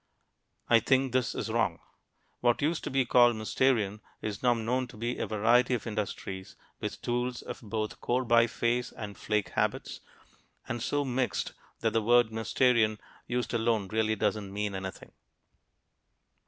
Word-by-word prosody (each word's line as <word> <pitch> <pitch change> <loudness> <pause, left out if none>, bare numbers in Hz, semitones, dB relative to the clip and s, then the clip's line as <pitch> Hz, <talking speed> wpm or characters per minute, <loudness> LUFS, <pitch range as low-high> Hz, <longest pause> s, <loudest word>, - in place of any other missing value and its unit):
I 115 - +6
think 135 +2 +2
this 125 -1 0
is - - -3
wrong. - - +1 0.6
What 120 +3 +2
used 155 +2 0
to - - -2
be 135 -1 +2
called 120 -1 +5
"Mousterian" 110 -2 +1 0.2
is 105 -2 -4
now 125 -1 +4
known 125 +3 -1
to 125 - -13
be 120 +3 -3
a - - -1
variety 120 +4 +3
of 120 - -5
industries 100 -3 -4 0.2
with - - -5
tools 120 0 -1
of - - -7
both 110 -1 -4
core 125 +1 0
biface 120 +1 +2
and 105 -2 -6
flake 105 -1 -1
habits, - - -1 0.7
and 120 0 -3
so 145 +4 0
mixed 130 -1 -1 0.3
that 115 -2 +1
the 115 - +2
word 120 +1 +4
"Mousterian" 110 0 +2 0.3
used 120 0 -2
alone 115 -4 +1
really 110 0 +1
doesn't 100 -1 -1
mean 105 0 -2
anything. 95 0 -6
115 Hz, 155 wpm, -29 LUFS, 110-125 Hz, 0.7 s, I